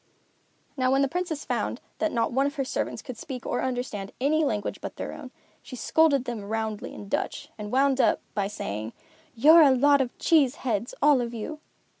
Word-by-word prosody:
Now 255 -1 +2
when 270 +1 +3
the - - +2
Princess 330 -1 -3
found - - -2 0.2
that 320 - +1
not 230 -1 0
one 270 +3 +2
of 285 - -5
her 275 -3 -1
servants - - -3
could 255 -4 -8
speak 255 -2 -7
or - - -1
understand 245 -6 -3
any 305 +4 +2
language 210 -8 -2
but - - -6
their - - -5
own, - - -9 0.3
she 255 - -9
scolded 280 0 +3
them 240 -4 -4
roundly 220 0 -3
in 205 - -9
Dutch, - - -3
and 210 -1 -7
wound 270 0 +3
up - - +3
by 200 -2 0
saying, 110 - -5 0.4
"You're 310 +8 +7
a 295 - +7
lot 280 +2 +4
of 250 -2 -3
cheese 295 -7 +3
heads, 230 -1 -1
all 290 -3 +5
of 235 0 -4
you." 300 +8 -5
255 Hz, 200 wpm, -26 LUFS, 225-285 Hz, 0.4 s, You're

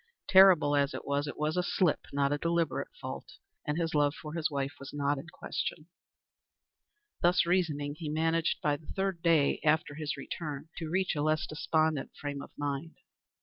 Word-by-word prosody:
Terrible 185 -6 +7
as 140 0 +1
it - - -6
was, 140 +1 0
it 145 - -6
was 155 +1 0
a 180 - +2
slip, 180 -2 +1
not 140 0 +1
a 145 - -1
deliberate 170 0 0
fault, - - -7 0.3
and 150 +1 0
his 165 -1 -1
love 145 0 +2
for 150 -1 -8
his 165 -2 0
wife 140 -1 -2
was 140 0 -8
not 145 0 0
in 160 - -10
question. 160 0 -4 1.3
Thus 175 +1 +4
reasoning, 155 -5 0
he 155 0 -6
managed 165 +1 +1
by 145 -1 +2
the 150 - -19
third 190 -3 -2
day 165 -4 +3
after 155 -1 +2
his 150 -1 -4
return 150 +1 -6
to 160 -2 -4
reach 185 +1 0
a 145 - -1
less 155 +1 +1
despondent 155 -1 0
frame 145 -1 -4
of - - -9
mind. 145 +3 -3
155 Hz, 185 wpm, -30 LUFS, 145-165 Hz, 1.3 s, Terrible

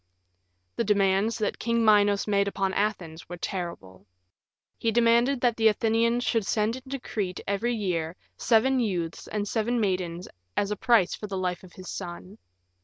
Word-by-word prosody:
The - - +1
demands 200 +1 +2
that 215 -3 -2
King 230 -1 +1
Minos 205 -1 +4
made 200 -1 +2
upon 195 -1 -1
Athens 180 -7 -2
were 175 - -6
terrible. 135 - -6 0.7
He 225 - +1
demanded 235 +3 +3
that 240 -2 +2
the 225 -1 +4
Athenians 230 +2 +2
should 225 -5 0
send 215 +1 +1
into 260 +1 -6
Crete 195 -6 -4
every 225 +5 0
year 175 -6 -2 0.2
seven 255 +3 +3
youths 175 -8 -2
and 210 -1 -3
seven 235 +3 0
maidens 180 -4 -1 0.3
as 200 0 +1
a - - 0
price 220 -4 +3
for 210 - -6
the 195 -1 -4
life 180 -1 -2
of 180 - -14
his 185 -1 -11
son. 185 +3 -8
205 Hz, 165 wpm, -27 LUFS, 185-230 Hz, 0.7 s, Minos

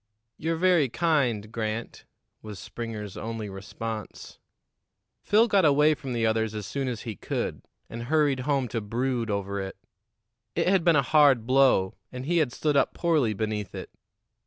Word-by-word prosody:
"You're 165 +1 -2
very 170 -5 +3
kind, 120 -7 0
Grant," 115 0 -4 0.4
was 105 -2 -8
Springer's 105 0 -6
only 110 -2 -5
response. 110 +2 -7 0.8
Phil 220 +3 +4
got 200 -4 +3
away 150 +1 +5
from 130 -2 -6
the 115 -1 0
others 110 -1 0
as 105 -2 -4
soon 135 +6 -3
as 120 -4 -3
he 115 -4 -6
could, - - -3 0.3
and 115 0 -7
hurried 145 -1 +2
home 135 -1 0
to 115 - -2
brood 120 +2 -2
over 100 -1 -2
it. 95 0 -6 0.8
It - - +1
had 190 -2 +3
been 170 -1 +4
a 140 - +4
hard 140 -5 +4
blow, 130 -7 +3 0.2
and 125 0 -6
he 170 +3 +2
had 145 -6 +1
stood 150 +3 -1
up 140 - +2
poorly 150 -11 +1
beneath 105 -2 -3
it. - - -7
120 Hz, 165 wpm, -27 LUFS, 110-150 Hz, 0.8 s, away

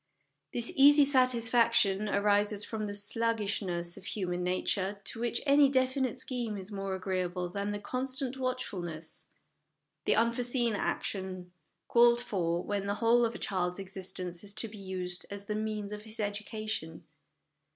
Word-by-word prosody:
This 235 -1 0
easy 290 0 +8
satisfaction 235 -6 +3
arises 205 0 +2
from 215 -2 -4
the 205 - -4
sluggishness 205 -5 0
of 195 - -12
human 180 -4 -2
nature, 190 +2 -1
to 225 - -3
which 235 0 -1
any 280 0 +6
definite 260 -1 +1
scheme 240 -5 -3
is 195 +2 -8
more 195 -1 -3
agree 185 0 -2
able 180 0 -3
than 200 +3 -3
the 205 - -2
constant 255 +4 -3
watchfulness, 185 -11 -4 0.8
the - - +4
unforeseen 235 0 +1
action, 185 -3 -3 0.4
called 235 0 +6
for 175 -7 -1
when 200 -1 -2
the 200 - 0
whole 235 +2 +4
of 230 0 -3
a - - -4
child's 180 -2 -1
exist 190 -1 -5
ence 180 0 -4
is 200 0 -3
to 225 - 0
be 210 -1 -11
used 185 -2 -4
as 200 0 -4
the 210 - -3
means 215 -1 -3
of 210 0 -6
his 220 +1 -12
education. 210 -5 -4
210 Hz, 155 wpm, -31 LUFS, 190-235 Hz, 0.8 s, easy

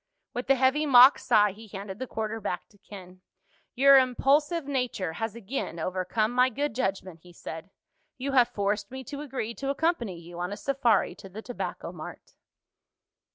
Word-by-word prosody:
With 245 +2 -5
a 270 - +6
heavy 265 +4 +2
mock 255 0 +8
sigh 210 -5 +3
he 220 +3 -13
handed 195 0 -8
the 260 - -4
quarter 220 0 -4
back - - -4
to 205 - -25
Ken. 185 -3 -12 0.5
"Your 275 +1 +7
impulsive 285 +5 +1
nature 250 -11 -2
has 225 +4 -4
again 235 -5 -5
overcome 185 +6 -1
my 250 +1 +3
good 285 +2 -2
judgment," 190 -7 -3
he 180 - -16
said. 165 +1 -9 0.5
"You 270 +2 -3
have 250 -3 +5
forced 205 0 -2
me 265 +1 -7
to 280 +3 -7
agree 260 -6 -4
to 275 +3 -5
accompany 275 - -1
you 170 +1 -11
on 180 +2 -3
a 205 - -5
safari 270 -5 +1
to 195 - -13
the 215 +4 -9
Tobacco 245 - -5
Mart." - - -10
230 Hz, 175 wpm, -27 LUFS, 195-265 Hz, 0.5 s, mock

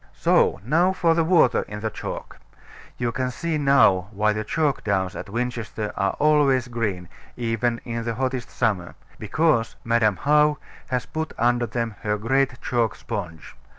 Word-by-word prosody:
So - - +3
now 170 +8 +3
for 175 -3 +2
the 165 0 +2
water 160 -7 +4
in 105 0 -7
the 110 0 -2
chalk. - - -7 0.6
You 120 -1 -1
can 130 +2 -2
see 160 +4 -2
now 135 -10 +4
why 105 0 +1
the 110 +1 -3
chalk 150 +4 0
downs 95 -2 -1
at - - -7
Winchester 115 -2 -3
are 95 0 0
always 145 -4 +3
green, 105 -7 -3 0.3
even 115 0 -1
in 115 -1 -3
the 115 -1 -3
hottest 130 -1 -2
summer: 100 -7 -1 0.2
because 115 +1 +1
Madam 115 -3 +2
How 150 +4 +3 0.3
has 125 -2 -2
put 160 0 -4
under 120 0 +2
them 115 0 -3
her 105 0 -1
great 130 +4 0
chalk 120 -3 0
sponge. 90 -9 -6
120 Hz, 160 wpm, -23 LUFS, 105-140 Hz, 0.6 s, water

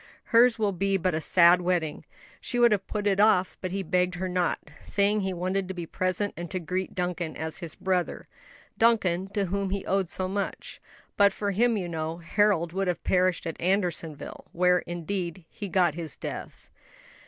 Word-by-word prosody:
hers 235 +1 +6
will 210 -2 +1
be 195 +1 0
but 185 -1 0
a 155 - -1
sad 175 +2 +5
wedding. 175 -4 -1 0.4
She 245 - -3
would 240 -1 +6
have 200 -2 0
put 210 -1 -3
it 200 -1 +2
off, 205 -3 +4
but 185 - -3
he 195 +1 -2
begged 180 -1 +1
her 185 +1 -3
not, 180 -1 -1
saying 205 +1 +1
he 190 -1 -1
wanted 185 +2 -2
to 190 - -5
be 175 -1 -4
present 185 +4 0
and 175 +1 -6
to 185 - -3
greet 180 +3 -3
Duncan 180 -3 -3
as 160 0 -4
his 170 -4 -7
brother 185 -2 -1 0.5
Duncan, 195 -6 +3
to 200 -1 +1
whom 195 +1 -2
he 195 0 -3
owed 195 -2 0
so 185 +1 -2
much. 195 +1 -4 0.4
But 200 -1 +6
for 200 +1 -2
him, 230 +3 +2
you 185 -3 -3
know, 160 -1 -3
Harold 175 -1 +1
would 195 0 -1
have 180 - -2
perished 185 -1 +2
at 165 - -5
Andersonville; 175 -5 -2
where, 180 +1 +4
indeed, 175 0 -4
he 205 - -7
got 175 -3 +3
his 165 -1 -5
death." - - -7
185 Hz, 190 wpm, -27 LUFS, 175-200 Hz, 0.5 s, hers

